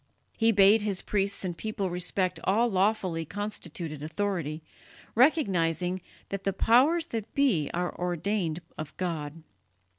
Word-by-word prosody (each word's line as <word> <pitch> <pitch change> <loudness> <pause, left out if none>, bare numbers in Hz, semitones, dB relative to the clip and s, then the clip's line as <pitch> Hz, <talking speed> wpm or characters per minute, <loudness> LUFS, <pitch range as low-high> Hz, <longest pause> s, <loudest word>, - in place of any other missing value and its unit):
He 225 0 +3
bade 205 +1 +6
his 200 -3 -2
priests 200 -1 0
and 175 -2 -3
people 200 -2 -3
respect 180 +1 -1
all 220 +5 +3
lawfully 190 -4 +1
constituted 170 -5 -5
authority, 160 -2 -2 0.5
recognizing 185 - +2 0.3
that 195 0 -4
"the 195 - 0
powers 275 - +4
that 225 -1 -3
be 230 - +2
are 175 +1 -2
ordained 175 -1 -1 0.2
of 155 -2 -7
God." 165 -3 -4
190 Hz, 125 wpm, -28 LUFS, 170-210 Hz, 0.5 s, bade